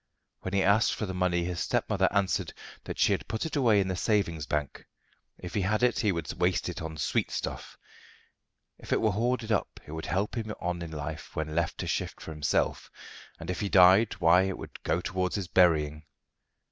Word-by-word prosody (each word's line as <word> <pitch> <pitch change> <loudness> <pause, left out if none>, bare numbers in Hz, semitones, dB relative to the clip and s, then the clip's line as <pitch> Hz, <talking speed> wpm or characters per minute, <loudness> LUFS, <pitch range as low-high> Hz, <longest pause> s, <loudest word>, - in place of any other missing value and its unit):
When 95 +1 -4
he 95 - +3
asked 100 +3 +3
for 110 - -3
the 95 - -5
money, 90 -1 +1
his 90 0 -3
stepmother - - +1
answered 100 -1 0 0.3
that - - -5
she - - +3
had - - -1
put 110 +5 -3
it 160 - -4
away 120 -7 +4
in 95 - +1
the 95 - -1
savings 90 -7 0
bank. 75 -2 -3 0.5
If 90 - -8
he 105 - 0
had 105 +5 0
it 125 -1 +3
he 105 - +2
would 85 -4 -3
waste - - +2
it - - -6
on 80 -1 -6
sweetstuff; - - -2 1.0
if - - -11
it - - +3
were 110 - +2
hoarded 115 +2 -1
up 100 - -1
it - - -11
would 80 0 -5
help 100 +3 -1
him 110 -2 -3
on 85 0 -3
in 85 - -5
life 75 -2 -6
when 80 0 -3
left 85 0 -1
to - - -4
shift - - -2
for - - -8
himself; 75 -3 -1 0.5
and 85 +2 -4
if 90 - -4
he 100 - -1
died, 95 +4 +6
why 90 -1 +5
it 95 0 -1
would - - -10
go 90 - 0
towards 95 0 -2
his 100 -4 -3
burying. 80 -4 +3
90 Hz, 210 wpm, -29 LUFS, 85-105 Hz, 1.0 s, died